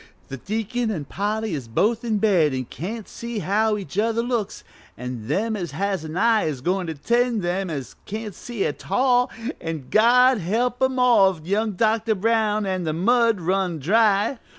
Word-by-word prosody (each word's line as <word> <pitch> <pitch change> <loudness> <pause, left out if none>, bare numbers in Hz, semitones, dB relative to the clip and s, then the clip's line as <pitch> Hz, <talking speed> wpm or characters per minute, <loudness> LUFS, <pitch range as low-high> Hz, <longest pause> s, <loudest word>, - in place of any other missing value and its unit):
The 135 - -6
deacon 225 - -2
an' 165 -9 -3
Polly 210 +4 -2
is 135 -6 -4
both 220 - +1
in 225 -3 0
bed 180 -9 +3
an' 130 -1 -3
can't 200 - -6
see 235 -1 -6
how 210 +2 +1
each 195 -1 -5
other 230 +1 +1
looks, 235 -4 -3 0.3
an' 125 -3 -6
them 220 - 0
as 175 -5 -5
has 195 -4 -2
a 155 - -7
eye 225 0 +3
is 145 -5 -3
goin' 180 +4 -1
to 160 - -4
tend 235 - +1
them 180 +2 -1
as 140 -5 -6
can't 215 0 -5
see 230 +2 -4
at - - -5
all, 250 -1 +3 0.3
an' 160 -5 -5
God 250 +3 +5
help 235 +8 -1
'em 260 0 +1
all 215 -7 +4
if 155 - -16
young 210 +3 0
Dr. 220 +2 +1
Brown 215 0 +1
an' 185 -2 -2
the 155 -2 -1
mud 230 +3 +2
run 185 0 0
dry!" 210 - +2
210 Hz, 185 wpm, -23 LUFS, 175-230 Hz, 0.3 s, God